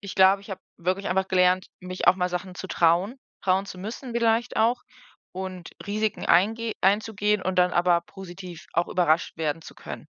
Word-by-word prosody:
ich 200 -3 -7
glaube, 190 +1 +5
ich 200 - -16
habe 190 - -6 0.2
wirklich 185 +3 -1
einfach 190 +1 0
gelernt, 185 0 +3
mich 185 0 -5
auch 185 - +7
mal 180 -1 0
Sachen 180 +1 -4
zu 190 - -7
trauen, 175 +9 +2 0.3
trauen 190 +1 +2
zu 185 - -8
müssen 230 +6 -7
vielleicht 235 +1 +1
auch 235 +3 +2 0.5
und 185 -2 -6 0.2
Risiken 210 +1 -1
eingeh 225 +5 +3
einzugehen 210 0 +1
und 185 0 -2
dann 180 0 +4
aber 175 0 +3
positiv 180 -1 -10
auch 170 +1 +1
überrascht 170 -2 +1
werden 160 0 -2
zu - - -12
können. - - -9
190 Hz, 180 wpm, -25 LUFS, 180-205 Hz, 0.5 s, auch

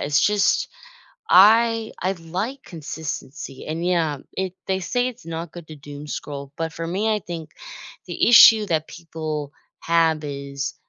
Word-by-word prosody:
it's 145 0 +2
just 205 -1 +2 0.6
I 225 +3 +5
I 190 +1 +1
like 190 +10 -5
consistency. 150 -4 -7
And, 160 +2 -3
yeah, 165 -5 +1 0.2
it 190 -1 -2
they 190 0 -1
say 245 +7 0
it's 250 -4 -11
not 165 0 -6
good 170 -3 -11
to 155 - -9
doom 145 +1 -10
scroll. 140 -1 -6
But 165 0 -3
for 165 +1 -5
me, 210 +5 0
I 210 - -2
think 165 -3 -7 0.6
the - - +1
issue 225 -2 +8
that 160 -3 -1
people 155 -3 -6 0.3
have 165 -2 +2
is, 140 -1 -5
165 Hz, 155 wpm, -22 LUFS, 150-195 Hz, 0.6 s, issue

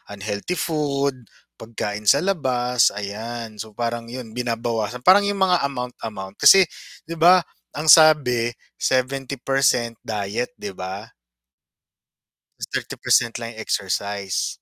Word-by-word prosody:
unhealthy 100 - -4
food, 140 -6 -2 0.3
pagkain 105 -2 -5
sa 140 +7 +5
labas, 125 -10 +1
ayan. 110 +2 -6
So, 110 0 -8
parang 115 0 -3
yun 120 -1 -8
binabawasan 115 0 -3
parang 200 +5 +6
yung 200 -1 0
mga 180 -2 +3
amount-amount. 115 -7 -7
Kasi 195 0 +8 0.4
'di 165 0 -8
ba 180 +2 +6 0.3
ang 155 +1 +4
sabi, 130 -7 +5 0.2
70% 135 -2 0
diet, 110 +7 -3
'di 100 - -7
ba? 95 +3 -7 1.5
Ta's - - -5
30% 120 -1 0
lang 115 -1 -6
yung 110 - -12
exercise. 100 -1 -2
120 Hz, 115 wpm, -22 LUFS, 110-140 Hz, 1.5 s, Kasi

